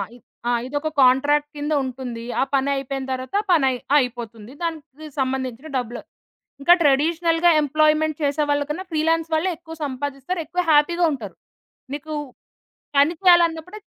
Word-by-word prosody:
ఇ - - -14 0.3
ఆ - - +2 0.2
ఇదొక 290 +3 -2
కంట్రాక్ట్ 290 +3 +4
కింద 295 +1 -2
ఉంటుంది. 250 -3 -6 0.2
ఆ - - +5
పనయిపేన 275 0 -1
తరువాత 260 +7 -2
పనయి 270 -7 +3 0.2
అయిపోతుంది. 235 -3 -3
దానికి 310 -2 -6
సంబంధించిన 260 +1 -2
డబ్బులు 240 -1 -4 0.6
ఇంకా 345 +5 +7
ట్రెడిషనల్‌గా 330 +4 +3
ఎంప్లాయిమెంట్ 310 +1 +2
చేసేవాళ్లకన్నా 290 +3 0
ఫ్రీలాన్స్ 325 +1 +1
వాళ్ళే 315 +4 +1
ఎక్కువ 325 -1 -11
సంపాదిస్తారు. 280 +5 -4
ఎక్కువ 360 +3 -1
హ్యాపీ‌గా 340 +4 +4
ఉంటారు. 220 -8 -7 0.6
నీకు 300 +2 -6 0.8
పని 285 +4 +5
చేయాలన్నప్పుడే 345 +1 +3
290 Hz, 120 wpm, -22 LUFS, 265-320 Hz, 0.8 s, ఇంకా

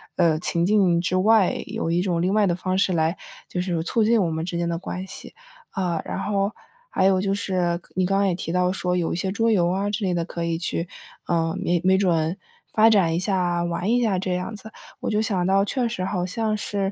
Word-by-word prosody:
呃， 165 -3 +3
情 170 0 0
境 190 -4 +3
之 175 +1 -1
外， 205 +1 +4
有 210 -6 -2
一 175 - +2
种 180 -3 0
另 185 - +1
外 210 -1 +3
的 175 - +1
方 185 0 -2
式 190 0 +2
来 160 0 +1 0.3
就 180 - -3
是 175 -3 -1
促 220 +6 +1
进 225 +1 +3
我 165 - -1
们 160 0 -2
之 175 0 -3
间 170 0 -1
的 170 0 -2
关 185 0 -5
系， 190 - -9 0.4
啊， 175 -4 -1
然 - - -4
后 200 0 0 0.4
还 190 - +1
有 190 -1 +4
就 195 0 0
是 180 -3 -1 0.2
你 185 -1 +2
刚 195 +1 +1
刚 200 - +3
也 185 - +1
提 165 - -4
到 180 +1 +2
说 180 -1 -1
有 170 -2 -1
一 - - -1
些 190 +2 -2
桌 225 +3 +1
游 175 -5 +3
啊 195 +3 -1
之 210 - -3
类 180 - 0
的， 170 -1 0
可 170 -1 -5
以 165 -1 -1
去 170 0 -2 0.4
呃， 165 0 0
没 175 -2 +1
没 190 0 +5
准 170 -2 +1 0.4
发 220 0 +6
展 185 -7 +3
一 - - 0
下 180 -3 0
玩 175 +3 -2
一 245 +1 +3
下 200 -5 +1
这 185 0 -2
样 180 +5 -3
子。 220 +1 -10 0.3
我 - - -3
就 215 -1 +1
想 190 -5 0
到 195 +1 +3
确 245 +3 -1
实 225 -5 -4
好 185 -1 -1
像 215 +3 -1
是 200 -2 -2
185 Hz, 265 characters per minute, -23 LUFS, 175-200 Hz, 0.4 s, 发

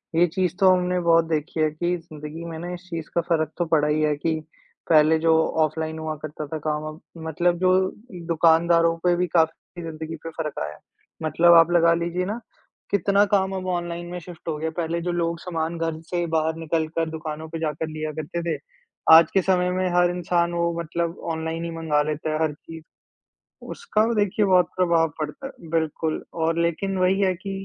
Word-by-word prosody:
ये 170 +2 +5
चीज़ 185 -2 0
तो 190 -2 +6
हमने 180 0 +1
बहुत 165 -1 +4
देखी 160 +1 -2
है 155 0 +3
कि 175 +3 -1
जिंदगी 155 -1 -9
में 160 - -6
ना 175 +2 -5
इस 175 - -7
चीज़ 165 -2 -5
का 170 - +3
फ़र्क 155 -2 +1
तो 175 - 0
पड़ा 155 -2 +2
ही 150 +1 +1
है, 150 -1 +2
कि 160 +2 -1 0.5
पहले 155 0 +5
जो 165 0 +3 0.3
ऑफलाइन 160 +1 -3
हुआ 155 0 -3
करता 150 0 -6
था 160 - -4
काम 150 0 -1
अब 155 +1 -8 0.3
मतलब 175 +2 +1
जो 185 0 +3 0.6
दुकानदारों 165 0 +4
पे 175 -1 +3
भी 180 +1 0
काफ़ी 165 +1 0
ज़िन्दगी 160 0 -6
पे 165 - -5
फ़र्क 155 -2 -5
आया 75 - -5
है। 75 - -17 0.4
मतलब 165 +2 +5
आप 165 0 +6
लगा 170 -1 +5
लीजिए 170 +2 -1
ना, 210 +5 -3 0.5
कितना 200 +1 +3
काम 195 -1 +1
अब 185 0 -4
ऑनलाइन 175 -1 -3
में 180 - -4
शिफ्ट 175 -1 -13
हो 160 -2 -1
गया। 160 +1 -2
पहले 170 0 -1
जो 175 +1 -2
लोग 170 -1 -1
सामान 165 -1 -3
घर 165 -1 -2
से 175 -1 0
बाहर 160 0 +1
निकल 160 0 -1
कर 165 -1 +1
दुकानों 160 0 -6
पर 165 0 -5
जाकर 155 0 -2
लिया 155 0 -4
करते 170 +3 -4
थे, - - -7 0.5
आज 160 0 +8
के 195 - +4
समय 180 -1 +2
में 185 0 0
हर 175 0 +4
इंसान 175 -1 0
वो 170 0 0
मतलब 170 +1 -3
ऑनलाइन 160 +1 -3
ही 170 - -4
मँगा 160 -3 0
लेता 155 +1 -3
है 155 - -1
हर 155 -2 0
चीज़। 160 +2 -12 0.9
उसका 345 - 0
देखिए 205 0 +2
बहुत 185 -2 +5
प्रभाव 170 -3 +3
पड़ता 155 - -5
है, - - -9 0.2
बिल्कुल 160 -1 -1
और 165 0 0
लेकिन 180 +4 -1
वही 185 +1 +2
है 190 -2 +3
कि 195 +3 -7
165 Hz, 205 wpm, -24 LUFS, 160-175 Hz, 0.9 s, आज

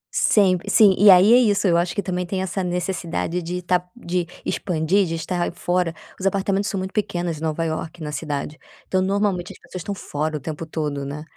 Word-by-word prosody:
Sempre, 185 -3 +3
sim. 200 -4 +6
E 205 +1 +6
aí 190 +5 +8
é - - +8
isso. 205 -5 +3
Eu 170 - +3
acho 175 +1 +1
que 200 - -1
também 180 -1 -2
tem 185 +1 -2
essa 190 +1 -2
necessidade 180 -1 -2
de 180 +2 -4
tá 180 0 +1
de 180 -6 -2 0.2
expandir, 180 +2 +1
de 165 - -2
estar 175 +2 -2
fora. 175 -1 0 0.3
Os 195 - 0
apartamentos 195 +1 0
são 195 - -3
muito 190 +1 -4
pequenos, 175 -6 -2
em - - -13
Nova 160 +1 -1
Iorque, 160 +1 -4
na 150 - -4
cidade. 150 0 -4 0.3
Então, 185 - +1
normalmente 195 -2 0
as - - -16
pessoas 185 - -9
estão 200 +2 -4
fora 155 -2 -3
o - - -6
tempo 160 +3 -6
todo, 150 -3 -3
né, 145 +2 -6
180 Hz, 210 wpm, -22 LUFS, 165-190 Hz, 0.3 s, aí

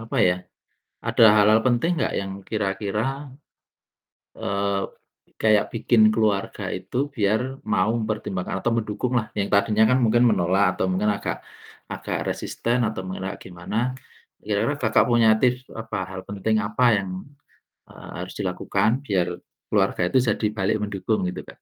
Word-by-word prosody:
apa 115 - -6
ya, 90 - +2 0.7
ada - - +4
hal-hal 105 +1 +5
penting 125 +8 +2
enggak - - 0
yang 95 -1 -5 0.2
kira-kira, 105 0 -1 1.4
eee, 100 0 -1 0.6
kayak 110 -2 +4
bikin 115 0 +3
keluarga 105 -3 0 0.2
itu - - -9 0.2
biar 105 0 +2 0.3
mau 105 -1 +2
mempertimbangkan 105 -4 -3
atau 120 - +1
mendukung 110 +3 -2
lah, 110 - -3
yang 100 0 0
tadinya 105 +2 +3
kan 130 - +3
mungkin 120 +2 +3
menolak 95 +1 +2 0.2
atau - - +1
mungkin 105 +3 +1
agak - - -3 0.6
agak - - -3
resisten 120 +2 -1
atau 110 -3 -3
mengelak 95 +1 -4
gimana. 90 +3 -7 0.7
Kira-kira 105 +7 0
Kakak 110 -2 +4
punya 120 -2 +5
tips 125 0 +1
apa, 110 -2 -5
hal 95 0 -6
penting 100 +2 0
apa 110 +5 0 0.2
yang, 95 - -6 0.8
eee, - - -12
harus 90 - -6
dilakukan 100 +2 0 0.2
biar, 95 -4 +1 0.4
keluarga - - +1
itu - - +2
jadi 105 - 0
balik 95 +2 +1
mendukung? 105 +1 -1
Gitu - - -6
Kak. - - -48
105 Hz, 145 wpm, -24 LUFS, 95-110 Hz, 1.4 s, hal-hal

